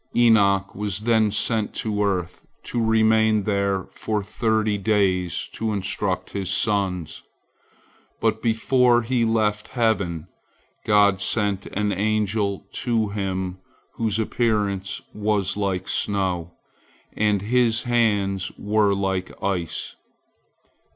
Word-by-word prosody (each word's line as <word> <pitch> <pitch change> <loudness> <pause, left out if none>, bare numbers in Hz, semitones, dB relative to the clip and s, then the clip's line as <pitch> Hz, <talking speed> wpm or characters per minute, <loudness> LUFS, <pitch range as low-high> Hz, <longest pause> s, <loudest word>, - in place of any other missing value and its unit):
Enoch 100 -5 +4
was 105 -1 -3
then 110 -1 +3
sent 110 +1 -1
to 105 -2 -1
earth 90 -3 -2 0.2
to 120 - -2
remain 110 -1 +3
there 100 -2 0
for 105 -2 -2
thirty 110 0 0
days 95 -4 0
to 110 -1 -2
instruct 95 -1 -2
his 100 -2 -3
sons, 95 -6 -1 1.0
but - - 0
before 120 +1 +3
he 120 0 +1
left 110 -2 +1
heaven, 95 -8 0 0.6
God 100 -2 +4
sent 100 -2 0
an 105 +1 -1
angel 105 0 0
to 115 -4 0
him 95 -2 -3 0.3
whose 110 -2 -1
appearance 105 -4 -1
was 105 -2 0
like 95 -2 -2
snow, 90 -4 -1 0.6
and 105 -2 +1
his 115 0 +2
hands 105 -6 +1
were 105 -1 +2
like 95 -1 -2
ice. 90 -4 -2
105 Hz, 110 wpm, -23 LUFS, 95-110 Hz, 1.0 s, Enoch